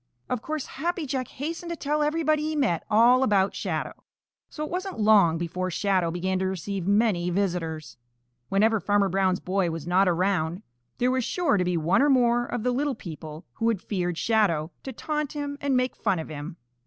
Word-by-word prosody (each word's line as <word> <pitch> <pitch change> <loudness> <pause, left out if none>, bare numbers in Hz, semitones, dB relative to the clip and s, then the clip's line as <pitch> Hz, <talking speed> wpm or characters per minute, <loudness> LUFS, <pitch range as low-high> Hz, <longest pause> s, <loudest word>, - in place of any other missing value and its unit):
Of 250 -3 -1
course 310 +2 -4
Happy 335 +3 -3
Jack 260 -2 -2
hastened 330 +5 -5
to 340 - -2
tell 300 -1 -1
everybody 305 0 +1
he 310 +1 -2
met 245 - +1
all 235 +4 +5
about 200 -6 +2
Shadow, - - -3 0.6
so 305 - -5
it - - -9
wasn't 370 - -4
long 205 -6 +5
before 180 +2 -3
Shadow 185 -1 +1
began 185 +2 -1
to 190 - 0
receive 190 0 -4
many 200 -4 +2
visitors. 170 -6 -2 0.5
Whenever 215 +3 +3
Farmer 200 +1 +2
Brown's 185 0 +1
boy 185 -1 0
was 165 -2 -5
not 185 +3 +3
around 180 0 0 0.3
there 250 +1 +2
was 260 -1 0
sure 350 -2 +1
to 185 - +2
be 180 -1 0
one 170 +8 +2
or 290 - +4
more 240 -2 +3
of 240 -3 -3
the 250 - +1
little 275 +2 0
people 155 -2 -9
who 225 - -1
had 225 -5 0
feared 175 -4 -2
Shadow 180 -9 +1
to 265 - -6
taunt 300 +3 -3
him 290 -1 -4
and 275 -2 +1
make 255 0 0
fun 190 - 0
of 160 - -5
him. 155 +3 -7
205 Hz, 195 wpm, -26 LUFS, 180-265 Hz, 0.6 s, all